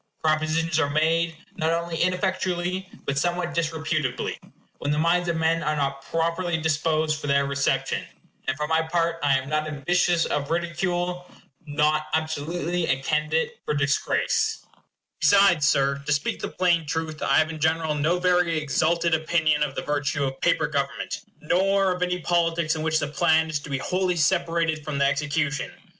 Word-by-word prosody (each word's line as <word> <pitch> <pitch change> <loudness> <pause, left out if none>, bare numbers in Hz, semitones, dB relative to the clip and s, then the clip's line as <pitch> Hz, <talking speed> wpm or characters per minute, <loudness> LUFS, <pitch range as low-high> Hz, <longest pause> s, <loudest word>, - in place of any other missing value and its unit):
Propositions 155 +1 +1
are 145 -3 +1
made, 160 +2 +1 0.2
not 160 -1 +1
only 170 0 -2
ineffectually, 185 0 -1 0.2
but 140 0 0
somewhat 175 0 -1
disreputably, 160 -3 -2 0.4
when 145 - -3
the 150 - 0
minds 175 +2 +2
of 170 - 0
men 165 +1 +1
are 150 0 0
not 140 -1 -2
properly 170 +1 -1
disposed 155 0 0
for - - -5
their 140 0 +3
reception; 140 0 0 0.4
and, 135 0 0
for 150 - -1
my 160 +1 +2
part, 165 0 -1
I 140 -2 +3
am 130 0 -5
not 155 +1 -1
ambitious 170 +3 +1
of 140 -1 -2
ridicule 175 +1 -2 0.4
not 150 +1 +1
absolutely 160 +2 -2
a 130 - +1
candidate 155 +2 0
for 150 - -2
disgrace 145 -1 0 0.5
Besides, 185 -7 +5
Sir, 140 -1 +2
to 145 - -3
speak 145 0 0
the - - -3
plain 170 -4 +1
truth, 160 0 -3
I - - +3
have 155 0 +3
in 160 - -7
general 160 0 +1
no 155 +4 +1
very 180 -2 +2
exalted 160 +3 +1
opinion 155 -1 +2
of 145 -2 -1
the - - -3
virtue 145 -1 -1
of 135 -1 -3
paper - - +2
government; - - -3 0.2
nor 195 +4 +2
of 180 0 -3
any 180 0 0
politics 165 -2 +1
in 155 - -4
which 160 0 +1
the 145 - -1
plan 160 +2 +2
is 150 - -1
to 145 - -11
be 140 - -1
wholly 180 +5 0
separated 165 -1 +1
from 145 -1 -4
the 140 - +3
execution. 145 +1 -1
160 Hz, 170 wpm, -25 LUFS, 150-170 Hz, 0.5 s, Besides